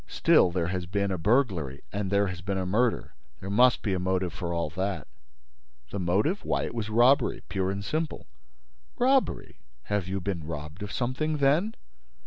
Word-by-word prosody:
"Still, - - +4
there 85 -1 -1
has 90 -2 -3
been 100 +1 -1
a 95 - -1
burglary 90 - +1
and 100 -1 -2
there 100 +1 +3
has 90 -3 -5
been 95 +1 -2
a 95 - -1
murder: 110 +6 0 0.3
there 95 - -6
must 125 +3 +4
be 100 - 0
a 95 - 0
motive 90 -1 -1
for 85 -1 -4
all 85 -3 -2
that." 95 +3 -3 0.8
"The 100 - -3
motive? 100 - +1
Why, - - 0
it - - -4
was 110 -2 -3
robbery 120 +4 +3
pure 95 -1 -1
and 100 +1 -4
simple." 155 +3 -2 0.7
"Robbery? 265 +1 +1 0.2
Have 105 -3 -1
you 95 +1 -2
been 90 -3 -3
robbed 75 +3 -7
of 105 - -5
something, 135 +5 -1
then?" 150 +10 +2
100 Hz, 180 wpm, -27 LUFS, 90-120 Hz, 0.8 s, Still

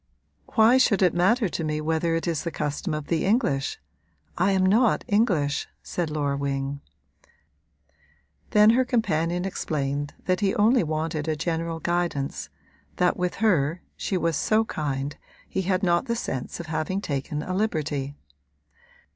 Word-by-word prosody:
'Why 230 +3 +6
should 200 -6 +3
it 180 - +4
matter 210 +6 +3
to 170 - -3
me 155 -1 -1
whether 160 +2 0
it 165 - -2
is 165 -3 0
the 170 - -2
custom 150 +3 -3
of 150 -1 -4
the 165 0 0
English? 190 - +1 0.6
I 185 +3 +2
am 190 -1 +3
not 220 +5 +3
English,' 185 - +1 0.2
said 175 -3 -3
Laura 145 -2 -1
Wing. 140 0 -2 1.7
Then 210 +1 +6
her 255 +3 +3
companion 180 -8 0
explained 145 -5 -2
that 185 0 +1
he 200 -2 +1
only 230 +4 +4
wanted 155 0 -2
a 155 - +1
general 165 +1 -2
guidance 170 -5 -2 0.5
that 180 0 +2
with 180 0 -2
her 165 -4 +2
(she 190 - -2
was 165 -2 0
so 220 +8 +2
kind) 145 -4 -3 0.3
he 190 - -2
had 185 +1 0
not 175 -2 +2
the 235 - 0
sense 130 - -4
of 170 - -5
having 160 +4 -2
taken 150 -3 -3
a 185 - -4
liberty. 150 -8 -1
170 Hz, 155 wpm, -25 LUFS, 150-195 Hz, 1.7 s, Why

